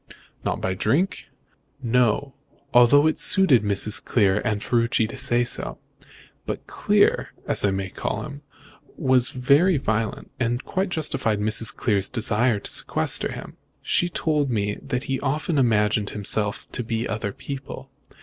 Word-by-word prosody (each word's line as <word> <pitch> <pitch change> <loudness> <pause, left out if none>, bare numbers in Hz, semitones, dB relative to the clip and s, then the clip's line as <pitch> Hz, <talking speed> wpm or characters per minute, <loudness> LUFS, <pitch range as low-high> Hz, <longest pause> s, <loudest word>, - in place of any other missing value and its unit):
"Not - - -2
by 95 - -1
drink?" 155 - -1 0.6
"No; 125 +3 +1 0.4
although 125 +4 +6
it 155 - +1
suited 185 -11 +5
Mrs. 105 0 +2
Clear 100 -3 +2
and 110 -3 -1
Ferruci 115 -1 +1
to - - -9
say 120 0 +2
so. 120 - 0 0.7
But - - -5
Clear, - - +1 0.2
as - - 0
I 100 - +3
may 95 0 -3
call - - -4
him, 145 -1 -9 0.6
was 130 -4 +3
very 145 +8 +3
violent, 110 -3 -3
and 120 +1 -2
quite 190 0 -2
justified 135 -10 -1
Mrs. 110 +1 +2
Clear's 100 -4 0
desire 115 -1 +1
to - - -5
sequester - - 0
him. - - -9 0.3
She 175 - +2
told 150 -4 -1
me 105 -3 -2
that 125 -2 -3
he 135 -2 -3
often 150 +2 -1
imagined 105 -4 +1
himself 105 0 +1
to - - -3
be 115 +1 -3
other 105 -2 -3
people. 135 +2 -8
120 Hz, 150 wpm, -23 LUFS, 105-140 Hz, 0.7 s, although